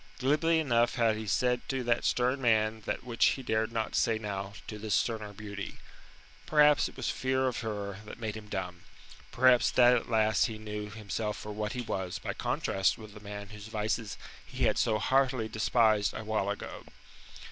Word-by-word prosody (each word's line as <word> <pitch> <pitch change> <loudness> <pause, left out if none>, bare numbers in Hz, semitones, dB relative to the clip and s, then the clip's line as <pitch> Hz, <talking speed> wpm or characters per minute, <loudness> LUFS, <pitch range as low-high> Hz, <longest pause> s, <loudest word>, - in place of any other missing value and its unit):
Glibly 155 +5 +2
enough 120 -6 +2
had 115 -3 +3
he 110 0 -6
said 125 +3 +1
to 130 -1 -1
that 120 0 +1
stern 125 +2 +1
man 110 -2 +2
that - - -2
which 120 -2 -1
he 135 - -7
dared 110 -1 0
not 115 -1 -2
say 115 -2 +2
now 100 -2 -5
to 105 - -7
this 105 0 0
sterner 110 -3 -1
beauty. 100 -1 -7 0.7
Perhaps 150 -1 +5
it - - -17
was - - -1
fear 130 0 0
of 125 - -2
her 100 -4 -4
that - - -9
made 110 -2 -3
him 110 -1 -9
dumb, 90 -3 -4 0.5
perhaps 125 -1 +5
that 125 0 +6
at 120 - -2
last 110 -1 +3
he 110 -2 -6
knew 105 -1 -5
himself 105 0 -4
for 105 - -7
what 105 0 -3
he 125 - -3
was 95 -6 -3
by - - -4
contrast 95 -1 0
with 110 -2 -11
the 105 - -11
man 105 -1 -8
whose 105 0 -10
vices 110 0 -2 0.3
he - - -4
had - - +2
so 110 - +2
heartily 130 +1 +2
despised 110 -1 +2
a - - -5
while 105 -2 -1
ago. 100 - -5
110 Hz, 190 wpm, -30 LUFS, 105-120 Hz, 0.7 s, that